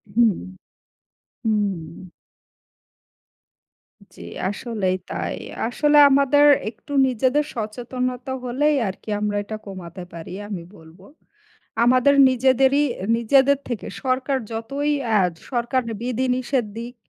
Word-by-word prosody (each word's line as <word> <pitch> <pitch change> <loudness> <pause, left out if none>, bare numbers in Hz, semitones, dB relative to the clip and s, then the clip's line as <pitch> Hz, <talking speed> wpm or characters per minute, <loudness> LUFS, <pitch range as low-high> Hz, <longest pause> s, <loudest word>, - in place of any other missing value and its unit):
হুম। 230 -4 +4 1.1
হুম। 210 -3 +1 2.4
জি - - -11 0.3
আসলেই 205 -3 -2 0.2
তাই। - - -3 0.3
আসলে 295 +4 +2
আমাদের 280 +1 +4 0.2
একটু 230 +6 -15 0.2
নিজেদের 260 +4 +1
সচেতনতা 250 +3 -4
হলেই 285 +5 +1
আরকি 190 +3 -7
আমরা 210 0 -1
এটা 215 +1 -6
কমাতে 185 -2 -8
পারি 165 -1 -8 0.2
আমি 200 -4 -5 0.2
বলব। 160 +2 -17 0.9
আমাদের 255 +3 +4 0.2
নিজেদেরই 265 +2 +3
এ 190 - -7
নিজেদের 270 +4 +4
থেকে 240 -4 -4 0.2
সরকার 265 +1 0
যতই 275 +7 -2
অ্যা 220 -3 +3 0.3
সরকার 245 +1 0 0.2
বিধি-নিষেধ 250 0 -1
দিক 240 +1 -7
245 Hz, 100 wpm, -22 LUFS, 215-265 Hz, 2.4 s, হুম